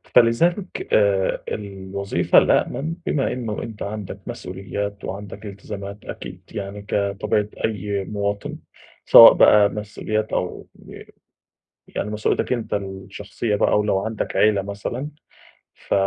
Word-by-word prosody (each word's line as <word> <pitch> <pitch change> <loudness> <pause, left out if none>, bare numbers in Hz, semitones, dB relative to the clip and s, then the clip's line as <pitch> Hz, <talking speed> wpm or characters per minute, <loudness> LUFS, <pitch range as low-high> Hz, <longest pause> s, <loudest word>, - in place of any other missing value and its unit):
فلذلك 170 - +3
آآ 100 -2 +3
الوظيفة 100 -1 -1
الأأمن، 160 +4 +2
بما 140 -3 0
إنه 115 -4 -4
أنت 110 -2 -9
عندك 105 -1 -6
مسئوليات 100 +2 -5
وعندك 100 +1 -7
التزامات 100 0 -8
أكيد، - - -8
يعني 100 0 -6
كطبيعة 100 +1 0 0.2
أي 100 -2 -2
مواِطن، 100 0 -3 0.5
سواء - - +11
بقى 105 -1 +6
مسئوليات 105 +1 -3
أو 90 - -3
ب - - -12 0.9
يعني 105 - -4
مسئوليتك 105 +3 0
أنت 115 -4 -2
الشخصية 100 +2 -3
بقى، 105 - +3
و 105 - +2
لو 95 -2 +2
عَندك 110 +1 -3
عيلة 105 -2 +4
مثلًا، 100 +8 -5 0.7
ف - - -5
105 Hz, 120 wpm, -22 LUFS, 100-110 Hz, 0.9 s, سواء